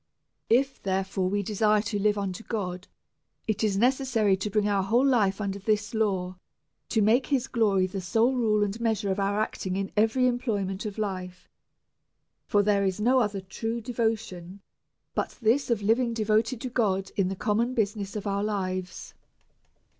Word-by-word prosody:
If, 265 +4 +2
therefore, 190 -1 -1
we 205 +1 0
desire 210 +1 +2
to 205 -1 -2
live 210 +1 +2
unto 200 +1 -3
God, 185 -4 -4 0.6
it 215 0 -1
is 205 -3 +1
ne 240 +5 +5
cessary 245 -7 +1
to 210 - -2
bring 210 +1 +1
our 200 -1 +2
whole 235 +7 +2
life 215 -7 +2
under 200 -1 -3
this 210 +1 -1
law, 190 -5 -1 0.5
to 220 -3 +2
make 235 +5 +3
his 270 -3 +1
glory 205 -7 +2
the 190 +1 -4
sole 225 +8 +2
rule 215 -4 +2
and 205 +3 -3
measure 220 -3 0
of 190 - -1
our 200 +1 0
acting 190 -3 -2
in 195 0 -3
every 225 +4 +3
employment 215 -5 -1
of 205 - -7
life; 185 -3 -4 1.0
for 205 0 +3
there 200 -1 +2
is 190 0 -1
no 250 +5 +4
other 205 -4 -1
true 225 +5 -4
devotion 220 -6 -3 0.5
but - - -3
this, 245 +4 +2
of 225 -4 0
living 230 +2 +2
devoted 220 +2 +1
to 255 - -3
God 195 -6 0
in 195 -2 +1
tha 195 - -3
common 230 +6 0
business 205 -2 -1
of 210 - -4
our 200 0 -1
lives. 185 -3 -3
210 Hz, 175 wpm, -27 LUFS, 195-225 Hz, 1.0 s, ne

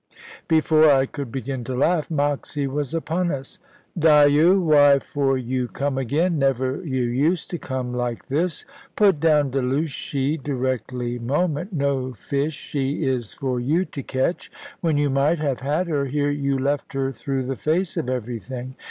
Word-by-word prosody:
Before 155 -1 +5
I 135 -2 +4
could 135 -3 -6
begin 130 0 -4
to 130 - -3
laugh, 155 +4 +1
Moxy 145 -1 -1
was 145 +2 -3
upon 170 +2 -1
us. 135 -4 -5 0.4
"Dyo! 155 +2 +5
Why 145 -5 +6
for 135 -1 0
you 125 0 -2
come 140 +1 -2
again? 155 +6 0
Never 135 +2 0
you 130 -6 -1
used 145 +8 0
to 175 - -3
come 130 -2 -4
like 120 -1 -3
this. 155 +5 -1 0.3
Put 195 -7 +4
down 150 -3 +3
Delushy, 140 +2 -1
directly 125 -2 -2
moment. 150 - -1
No 140 -5 -1
fish 140 +7 -2
she 140 +1 -2
is 125 -5 -2
for 130 -2 -2
you 155 +9 +1
to 140 - -7
catch. 130 +6 -2 0.3
When 165 -5 +1
you 145 -1 +1
might 140 +5 +2
have 145 -4 -1
had 150 +7 0
her, 145 -4 0
here 145 +1 0
you 140 -1 0
left 140 +2 -1
her 135 0 -1
through 135 +1 -3
the 135 +1 -3
face 165 +6 -1
of 125 - -2
everything. 125 +1 -5
140 Hz, 160 wpm, -23 LUFS, 130-155 Hz, 0.4 s, Why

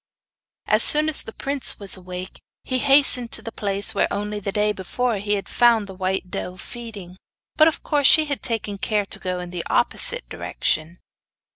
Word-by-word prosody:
As 215 +1 +2
soon 305 +4 +7
as 310 - +4
the - - -10
prince 275 +3 +1
was 200 -2 0
awake 180 0 -8 0.2
he 255 -1 -1
hastened 270 -3 +4
to - - -1
the 225 - -7
place 200 -2 0
where, 200 - 0
only 210 +1 -4
the 200 0 -5
day 210 +1 0
before, 220 +4 -3
he 205 +1 -2
had 200 - -6
found 235 -3 +2
the 195 - -11
white 185 0 -4
doe 180 0 -6
feeding; 205 -5 -10 0.4
but 310 - +5
of 320 - -2
course 290 -3 +2
she 315 - +6
had 285 -2 -4
taken 215 -4 -2
care 210 -1 -1
to - - -5
go 185 -1 -4
in 180 0 -8
the 175 -2 -5
opposite - - +1
direction. 160 +3 -3
210 Hz, 190 wpm, -21 LUFS, 190-250 Hz, 0.4 s, soon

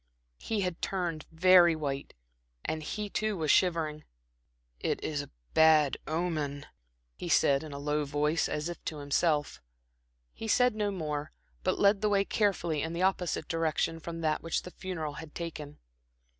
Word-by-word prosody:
He 220 -2 -2
had 180 -3 -2
turned 175 -5 -2
very 175 0 +6
white, 140 -3 -4 0.5
and 155 - -2
he 210 +7 -4
too 215 0 -1
was 155 -3 +2
shivering. 160 -4 +2 0.8
"It - - -1
is 145 -2 -1
a 145 - -10 0.2
bad 155 -3 +5
omen," 155 -3 -2 0.5
he - - -6
said, 140 -1 +4
in 155 -1 -8
a 140 - -6
low 150 +1 0
voice, 150 +3 +1
as 150 +2 -2
if 175 - -7
to 155 - -3
himself. 145 - 0 0.7
He 225 - -6
said 250 +2 +4
no 210 -1 0
more, 150 -6 -3 0.3
but - - +1
led 200 0 +4
the 210 - +2
way 200 -1 +3
carefully 175 -9 0
in 160 +2 -3
the 170 +2 -1
opposite 180 -4 0
direction 165 0 0
from 165 0 -6
that 155 -1 0
which 165 - -1
the 180 - -9
funeral 165 -6 -5
had 160 -2 -12
taken. 155 -4 -6
160 Hz, 165 wpm, -30 LUFS, 150-185 Hz, 0.8 s, very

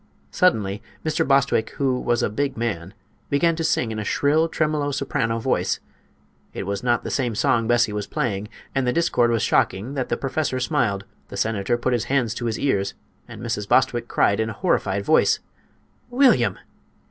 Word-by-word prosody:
Suddenly 105 - +1 0.2
Mr. 155 -1 0
Bostwick, 135 -5 +2
who 130 -2 +1
was 120 -1 0
a - - +1
big 140 +3 -2
man, 105 -5 -3 0.3
began 165 +4 +2
to 165 - -3
sing 125 -7 +1
in 110 - -4
a - - -2
shrill, 155 +8 +2
tremolo 150 -2 0
soprano 115 -5 -1
voice. 115 - 0 0.8
It - - -3
was 100 0 -3
not 120 -1 +1
the - - -4
same 120 -5 -1
song 115 +2 +2
Bessie 120 -2 +3
was 105 -1 -3
playing, 105 -3 -2 0.3
and 135 -2 0
the 125 - +2
discord 125 -8 +2
was 115 -2 +1
shocking 100 +9 +1
that 135 -3 -3
the - - 0
professor 135 -1 -1
smiled, 125 -8 0 0.2
the - - -8
senator 110 +1 0
put 125 +1 0
his 120 -1 0
hands 125 -5 +1
to 120 - -5
his 115 -2 -1
ears 100 -8 0 0.3
and - - -10
Mrs. 110 -3 -3
Bostwick 120 -2 +2
cried 100 -3 +2
in 110 0 0
a - - -4
horrified 100 +1 0
voice: - - +4 0.7
"William!" 245 - +3
120 Hz, 180 wpm, -23 LUFS, 110-140 Hz, 0.8 s, voice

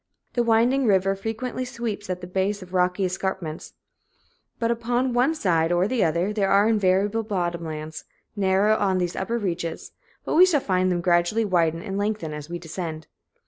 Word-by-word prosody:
The 240 - +1
winding 235 +3 +3
river 195 -1 +3
frequently 225 +5 -4
sweeps 230 -5 -5
at 180 0 -3
the - - -6
base 190 +2 -1
of 180 0 -15
rocky 180 +1 +1
escarpments, 185 -3 -4 0.8
but 230 0 0
upon 240 +2 0
one 255 +6 +2
side 165 - +1
or 175 +2 +2
the 245 0 +1
other 170 +5 0
there 200 -2 +1
are 200 +1 +5
now - - +3
invariably 205 +1 +2
bottom 175 -5 -2
lands 155 -1 -6 0.3
narrow 200 +1 +3
on 190 -3 +1
these 175 -1 -1
upper 230 +5 -2
reaches, 175 -6 -4 0.3
but - - -2
we 365 +3 +7
shall 320 -6 +3
find 185 -5 +1
them 175 -1 0
gradually 175 +6 +2
widen 165 -4 +1
and 195 -2 -3
lengthen 205 -6 -2
as 150 +1 -7
we 175 - -4
descend. 165 -1 -6
190 Hz, 185 wpm, -24 LUFS, 175-225 Hz, 0.8 s, we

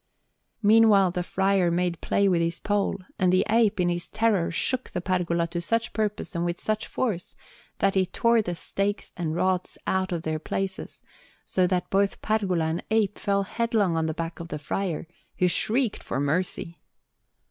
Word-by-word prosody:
Meanwhile 205 -3 +6
the 180 - -2
friar 190 0 +1
made 175 0 -1
play 200 - +2
with 175 -3 +3
his 170 0 0
pole, 205 -1 -1 0.2
and 185 -1 +3
the 185 - +3
ape, 220 -2 +3
in 180 - +3
his 175 0 -3
terror, 215 -5 +1
shook 250 +10 -2
the 180 - -3
pergola 175 -2 0
to 170 0 -3
such 230 +6 -1
purpose, 210 0 -2
and 170 -1 -1
with 175 0 -2
such 215 0 -2
force, 210 -9 -2 0.4
that 195 - +2
he 190 -1 +2
tore 230 +5 +3
the 175 -4 -3
stakes 200 +4 -2
and 165 -3 -2
rods 185 0 0
out 190 0 0
of 170 -2 -2
their 155 0 -2
places, 190 +4 -4 0.4
so 185 -1 +2
that 180 -1 -1
both 195 0 +1
pergola 195 -6 +1
and 160 +2 -2
ape 215 -2 +1
fell 200 0 +1
headlong 220 -4 0
on 160 0 0
the 160 - -3
back 165 +1 -4
of 170 - -6
the 155 - -4
friar, 165 +3 -3 0.3
who 180 - +3
shrieked 225 +6 +1
for - - -3
mercy. 170 +3 -1
185 Hz, 180 wpm, -26 LUFS, 170-205 Hz, 0.4 s, Meanwhile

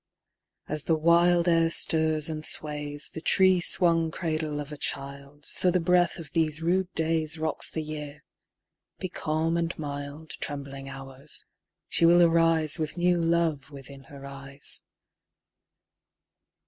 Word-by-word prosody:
3. - - -6
As 155 -1 +3
the 160 - +2
wild 170 +2 +3
air 165 -1 +3
stirs 160 -2 +2
and 155 -1 -5
sways 150 -1 +1
The 160 - -7
tree 185 +1 +4
swung 165 -2 +2
cradle 155 -3 -3
of 145 0 -7
a - - -6
child, 140 +1 -5
So 180 - +2
the 180 +1 +2
breath 175 +1 +2
of 160 -5 -10
these 155 -2 0
rude 180 +3 0
days 160 -1 0
_15 - - -10
Rocks 155 - +2
the 160 - -4
Year: 150 -1 -8 0.7
be 185 - -5
calm 160 +1 -1
and 170 0 -2
mild, 145 +1 -7
Trembling 140 -1 -6
Hours, 135 +1 -10 0.4
she 165 - +3
will 175 +1 +6
arise 165 -2 +3
With 155 +2 -4
new 175 0 +2
love 165 -4 0
within 140 -1 -12
her 140 -1 -12
eyes. 140 0 -5
155 Hz, 150 wpm, -26 LUFS, 145-170 Hz, 0.7 s, will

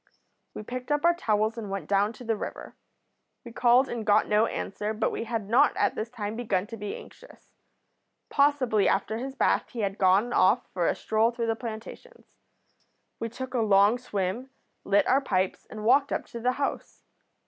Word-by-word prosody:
We - - -6
picked 250 +5 -6
up 295 +2 +1
our 345 - +6
towels 220 -7 0
and 210 -3 -6
went 195 0 -4
down 200 +1 +2
to 240 - -12
the 225 -1 0
river. - - -7 0.7
We 235 - -9
called 245 +3 +4
and 235 -3 -4
got 210 0 +3
no 210 +2 +3
answer, 210 +2 -4
but 220 - 0
we - - -4
had 225 -3 -3
not 230 +4 +3
at - - +2
this 220 +1 -4
time 215 -3 -5
begun 205 -6 -1
to 230 - -8
be 210 -2 -5
anxious. - - -15 0.7
Possibly 275 -8 +2
after 220 +1 -1
his 265 +2 -6
bath - - +1
he 235 - -5
had 200 0 -2
gone 195 +5 +3
off 225 +7 +3
for 175 -2 0
a - - +1
stroll 220 +1 +1
through 235 -1 -3
the 225 0 0
plantations. 230 - -10 0.8
We 230 - -3
took 260 +3 -7
a 250 - 0
long 205 +2 +4
swim, 210 +2 -3 0.3
lit 200 +1 +3
our 270 +2 +3
pipes, 190 -7 -1
and 215 -1 -8
walked 275 +4 +4
up - - -2
to 235 - -7
the 250 +2 +1
house. 280 +2 -4
225 Hz, 190 wpm, -27 LUFS, 210-250 Hz, 0.8 s, our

